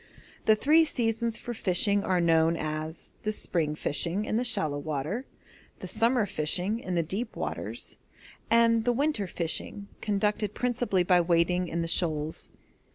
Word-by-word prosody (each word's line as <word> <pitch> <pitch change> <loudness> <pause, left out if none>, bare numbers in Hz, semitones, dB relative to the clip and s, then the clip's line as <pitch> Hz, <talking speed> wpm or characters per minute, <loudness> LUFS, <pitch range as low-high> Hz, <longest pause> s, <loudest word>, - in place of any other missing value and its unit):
The 215 - +6
three 305 +8 +4
seasons 230 -5 -1
for 240 - -6
fishing 200 0 +3
are 185 -1 +1
known 165 -1 +3
as 155 +1 -4
'the 215 - -1
spring 160 -7 -1
fishing' 170 +7 0
in 215 - -2
the 235 - +1
shallow 175 -12 +1
water, 155 - -4 0.5
'the - - -8
summer 235 -1 +2
fishing' 180 +5 0
in 185 -6 -4
the 170 - +2
deep 210 +8 -4
waters, - - -4 0.5
and 230 -1 +4
'the 245 +1 +2
winter 270 -6 0
fishing' 175 +4 -2
conducted 210 0 -1
principally 245 -6 0
by 175 0 +4
wading 175 +1 +1
in 170 0 -2
the - - -3
shoals. 160 -2 -1
195 Hz, 155 wpm, -28 LUFS, 165-230 Hz, 0.5 s, The